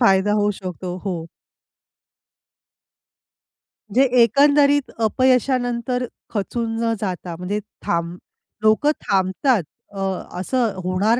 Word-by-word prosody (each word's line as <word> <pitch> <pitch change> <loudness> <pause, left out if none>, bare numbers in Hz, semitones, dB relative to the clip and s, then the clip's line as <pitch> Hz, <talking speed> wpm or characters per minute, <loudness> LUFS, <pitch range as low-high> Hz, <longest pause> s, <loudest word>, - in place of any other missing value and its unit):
फायदा 200 -2 +4
होऊ 205 - +2
शकतो. 180 -1 -5
हो. 190 -3 -1 2.8
जे 260 +6 +4 0.2
एकंदरीत 285 +2 +4
अपयशानंतर 250 0 +1 0.3
खचून 225 +2 -2
न 230 0 +1
जाता 180 -4 -4
म्हणजे 185 +4 -3 0.3
थांब 170 +1 -1 0.5
लोकं 220 +7 +4 0.2
थांबतात 195 +4 +2 0.3
अ, 195 - -7 0.4
असं 235 +2 0
होणार 195 +6 +2
220 Hz, 90 wpm, -21 LUFS, 190-250 Hz, 2.8 s, फायदा